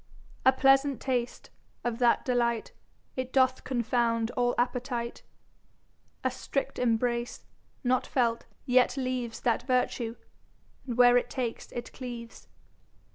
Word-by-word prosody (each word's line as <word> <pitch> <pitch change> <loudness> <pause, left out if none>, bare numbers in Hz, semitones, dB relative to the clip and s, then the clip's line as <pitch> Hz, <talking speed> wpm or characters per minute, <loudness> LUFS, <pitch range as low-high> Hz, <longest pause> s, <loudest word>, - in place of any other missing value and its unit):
A - - +9
pleasant 270 0 +3
Taste, 245 -3 -2 0.3
of 240 -1 -2
that 240 -2 +3
delight 235 -3 0 0.4
It 255 0 -3
doth 260 -1 +3
confound 235 -2 0
all 245 -1 +1
appetite. 245 -1 -2 1.0
A - - +1
strict 275 - -3
Embrace, 235 0 0 0.4
not 255 0 +1
felt, 235 -3 0 0.2
yet 250 +1 +3
leaves 255 -3 -3
That 235 -2 +1
vertue, 250 -3 0 0.7
where 245 -1 +5
it 245 - 0
takes 245 -4 -4
it 240 - -6
cleaves. 240 -3 -8
245 Hz, 115 wpm, -29 LUFS, 235-255 Hz, 1.0 s, A